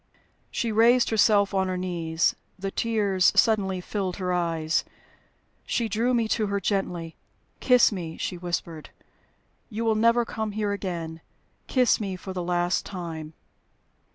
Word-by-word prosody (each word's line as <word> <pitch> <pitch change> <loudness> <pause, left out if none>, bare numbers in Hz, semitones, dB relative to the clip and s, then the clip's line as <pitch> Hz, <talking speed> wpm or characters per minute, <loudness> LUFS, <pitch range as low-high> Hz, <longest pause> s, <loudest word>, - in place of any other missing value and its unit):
She 235 -2 -2
raised 235 +3 +4
herself 205 -2 +4
on 190 -1 +1
her 185 0 -2
knees; 170 -3 0 0.2
the 195 0 -4
tears 205 -5 +2
suddenly 195 -4 +3
filled 185 0 -3
her 180 -2 -2
eyes. 165 -2 0 0.8
She 235 - -1
drew 230 +4 +1
me 230 -2 +1
to 220 -2 +1
her 200 0 -1
gently. 175 -4 -2 0.4
"Kiss 250 -2 +5
me," 170 -5 -5
she - - -3
whispered. 170 -2 -4 0.8
"You 225 0 -3
will 225 - +3
never 230 +2 +3
come 220 -2 -4
here 210 -1 -1
again. 170 -5 -4 0.5
Kiss 250 -3 +3
me 195 -3 -3
for 190 +1 -7
the 180 - -3
last 175 0 0
time." 165 -4 -6
195 Hz, 145 wpm, -26 LUFS, 175-220 Hz, 0.8 s, Kiss